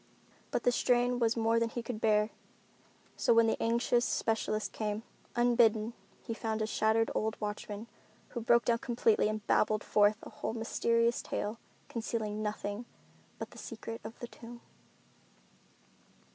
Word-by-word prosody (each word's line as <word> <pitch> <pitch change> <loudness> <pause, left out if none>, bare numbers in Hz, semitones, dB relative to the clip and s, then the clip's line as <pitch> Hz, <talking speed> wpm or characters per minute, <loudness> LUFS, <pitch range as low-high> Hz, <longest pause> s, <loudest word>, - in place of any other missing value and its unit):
But - - -1
the 245 - +4
strain 245 0 +2
was 230 -1 +2
more 225 0 +3
than 230 0 +1
he 240 0 -4
could 230 -2 -5
bear. 210 0 +3 0.8
So 235 - +3
when 230 0 +6
the 225 - 0
anxious 235 +1 +2
specialist 215 -2 0
came, 215 0 -3 0.3
unbidden, 235 -2 +3 0.3
he 230 - -3
found 220 -1 -2
a 215 - +1
shattered 220 +1 +2
old 220 +1 -1
watchman 210 0 -4 0.4
who 240 - -4
broke 235 +1 +4
down 230 -1 +2
completely 230 -3 +2
and 215 -1 -3
babbled 215 0 +2
forth 210 +1 +3
the - - -10
whole - - -4
mysterious 230 +1 +1
tale, 215 +3 -3 0.3
concealing 220 -2 -3
nothing 210 +1 -3 0.5
but - - -6
the - - -11
secret 225 -1 -7
of 220 +2 -8
the 240 - -6
tomb. 235 0 -11
225 Hz, 150 wpm, -32 LUFS, 215-235 Hz, 0.8 s, when